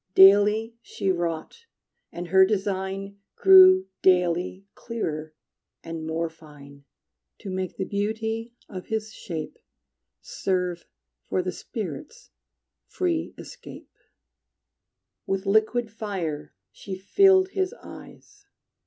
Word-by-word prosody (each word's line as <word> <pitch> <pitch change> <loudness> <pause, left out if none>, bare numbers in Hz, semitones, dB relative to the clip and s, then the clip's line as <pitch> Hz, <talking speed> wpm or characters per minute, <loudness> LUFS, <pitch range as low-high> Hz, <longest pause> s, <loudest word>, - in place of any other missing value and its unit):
Daily 205 +4 +6
she 195 -4 -2
wrought, 175 - -4 0.4
and 175 0 -7
her 190 +2 +6
design 195 0 -2 0.2
Grew 185 -1 +8 0.2
daily 180 +1 +2
clearer 155 -9 -5 0.5
and 165 -1 -6
more 165 +1 -1
fine, 145 -3 -15 0.6
To 195 - -6
make 185 -1 -4
the 190 - -2
beauty 220 +3 -3
of 185 -2 -8
his 220 0 -3
shape 160 -6 -7 0.6
Serve 180 -2 -3 0.4
for 185 - 0
the 185 - -2
spirit's 230 - -8 0.6
free 345 -3 -2
escape. - - -12 1.4
With 195 +1 -2
liquid 220 +3 +1
fire 190 - -5 0.2
she 190 -1 -7
filled 375 - +4
his 380 -1 -1
eyes. 410 0 -14
190 Hz, 100 wpm, -25 LUFS, 175-220 Hz, 1.4 s, Grew